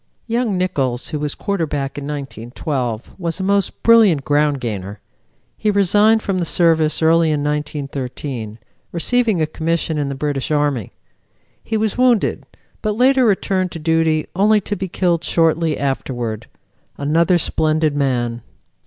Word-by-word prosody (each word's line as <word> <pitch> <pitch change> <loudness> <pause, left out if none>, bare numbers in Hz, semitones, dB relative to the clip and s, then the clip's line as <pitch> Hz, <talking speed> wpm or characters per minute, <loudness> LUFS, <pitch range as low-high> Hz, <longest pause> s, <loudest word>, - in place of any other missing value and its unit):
Young 230 -4 -1
Nichols, 135 -9 -1
who 155 -2 -3
was 150 -1 -3
quarterback 150 -8 -2
in 145 - -6
1912, 125 -3 -4
was 170 +1 -3
a - - -2
most 200 0 0
brilliant 215 -11 +5
ground 145 -1 +2
gainer. 105 -4 -5 0.6
He 215 - +1
resigned 205 +2 +3
from 190 -2 -1
the - - 0
Service 165 -2 +2
early 165 0 +4
in 150 -2 0
1913, 140 -6 -4 0.3
receiving 220 +3 +1
a - - +3
commission 160 0 -2
in 140 -1 -1
the 140 - -4
British 140 -1 -2
Army. 145 -7 0 0.7
He 220 - -2
was 220 +2 -1
wounded, 250 -4 +2 0.3
but 210 -1 -2
later 260 +1 +4
returned 190 -3 +1
to - - -5
duty 160 -1 +1
only 210 +3 +4
to 205 - -3
be 190 0 -4
killed 170 -2 0
shortly 165 -1 +1
afterward. 120 -5 -3 0.5
Another 165 +5 +2
splendid 155 -2 0
man. 120 -4 -1
155 Hz, 145 wpm, -19 LUFS, 140-190 Hz, 0.7 s, brilliant